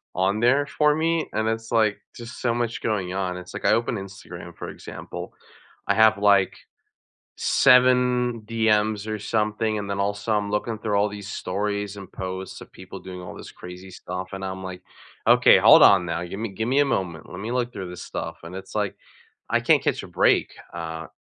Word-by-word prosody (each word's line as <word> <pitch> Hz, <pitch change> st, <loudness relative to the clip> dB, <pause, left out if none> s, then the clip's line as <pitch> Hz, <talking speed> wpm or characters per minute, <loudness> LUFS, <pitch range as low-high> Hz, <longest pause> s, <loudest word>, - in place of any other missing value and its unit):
on 95 Hz, +3 st, +1 dB
there 130 Hz, +5 st, +3 dB
for 150 Hz, 0 st, +2 dB
me 165 Hz, 0 st, +1 dB
and 110 Hz, 0 st, 0 dB
it's 115 Hz, +1 st, -4 dB
like 110 Hz, -3 st, +3 dB, 0.2 s
just 120 Hz, +1 st, -9 dB
so 120 Hz, -2 st, +1 dB
much 120 Hz, -1 st, -2 dB
going 95 Hz, -5 st, -1 dB
on 95 Hz, -1 st, -1 dB
and 90 Hz, -, -5 dB
it's 90 Hz, -, -11 dB
like -, -, -6 dB
I -, -, +5 dB
open 115 Hz, 0 st, 0 dB
Instagram 100 Hz, 0 st, -9 dB
for -, -, -7 dB
example, -, -, -8 dB, 0.5 s
I 100 Hz, -, +2 dB
have 110 Hz, -1 st, +5 dB
like, 100 Hz, -2 st, +4 dB, 0.9 s
7 125 Hz, -2 st, +4 dB
DMs, 110 Hz, -2 st, +1 dB
or 110 Hz, -, -2 dB
something, 110 Hz, 0 st, 0 dB
and 100 Hz, -1 st, -5 dB
then 100 Hz, 0 st, -2 dB
also 100 Hz, +2 st, -1 dB
I'm 105 Hz, -1 st, 0 dB
looking 105 Hz, +2 st, -1 dB
through 105 Hz, -2 st, -1 dB
all 100 Hz, +1 st, +3 dB
these 100 Hz, -1 st, -8 dB
stories 100 Hz, +1 st, -3 dB
and 100 Hz, -1 st, -10 dB
posts 95 Hz, 0 st, -6 dB
of -, -, -13 dB
people -, -, -10 dB
doing 90 Hz, -1 st, -9 dB
all 90 Hz, -, -9 dB
this -, -, -10 dB
crazy 90 Hz, +1 st, -10 dB
stuff 90 Hz, +1 st, -6 dB
and 95 Hz, 0 st, -5 dB
I'm 95 Hz, 0 st, -5 dB
like, 95 Hz, -1 st, -7 dB, 0.5 s
"Okay, -, -, +7 dB
hold -, -, +8 dB
on 95 Hz, -3 st, +6 dB
now, 85 Hz, +1 st, -2 dB
gimme 100 Hz, +6 st, -5 dB
gimme 120 Hz, +7 st, +1 dB
a 145 Hz, -, +5 dB
moment, 90 Hz, -, -3 dB
let -, -, -8 dB
me 110 Hz, +4 st, -4 dB
look 125 Hz, -1 st, -1 dB
through 95 Hz, -5 st, -6 dB
this 90 Hz, -, -8 dB
stuff," -, -, -6 dB
and 85 Hz, +3 st, -8 dB
it's 95 Hz, 0 st, -9 dB
like, 105 Hz, -2 st, -1 dB, 0.5 s
I -, -, +2 dB
can't -, -, +4 dB
catch -, -, 0 dB
a -, -, -8 dB
break, -, -, +2 dB, 0.2 s
uh, 80 Hz, -1 st, -5 dB
105 Hz, 200 wpm, -24 LUFS, 95-115 Hz, 0.9 s, hold